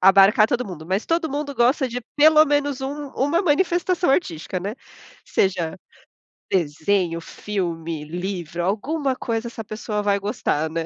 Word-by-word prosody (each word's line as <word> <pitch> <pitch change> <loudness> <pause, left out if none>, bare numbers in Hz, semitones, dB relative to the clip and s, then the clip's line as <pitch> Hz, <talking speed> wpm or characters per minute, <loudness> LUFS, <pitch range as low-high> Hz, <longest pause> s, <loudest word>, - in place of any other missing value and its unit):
abarcar 195 +3 +6
todo 245 +2 -1
mundo, 170 -5 -8
mas 190 +4 -1
todo 330 -2 0
mundo 285 0 -3
gosta 260 +2 +3
de 245 +1 -4
pelo 310 +1 +7
menos 290 -2 0
um 285 +2 -4
uma 290 +6 +2
manifestação 355 +1 +2
artística, 180 - -1
né. 200 +5 -4 0.5
Seja 185 -2 0 0.7
desenho, 170 +1 +1
filme, 165 -6 -4
livro, 175 0 -4
alguma 260 - -1
coisa 230 -1 -3
essa 230 -1 -7
pessoa 215 0 -3
vai 205 -1 +2
gostar, 160 -6 -1
né. 165 +1 -3
210 Hz, 145 wpm, -23 LUFS, 180-285 Hz, 0.7 s, pelo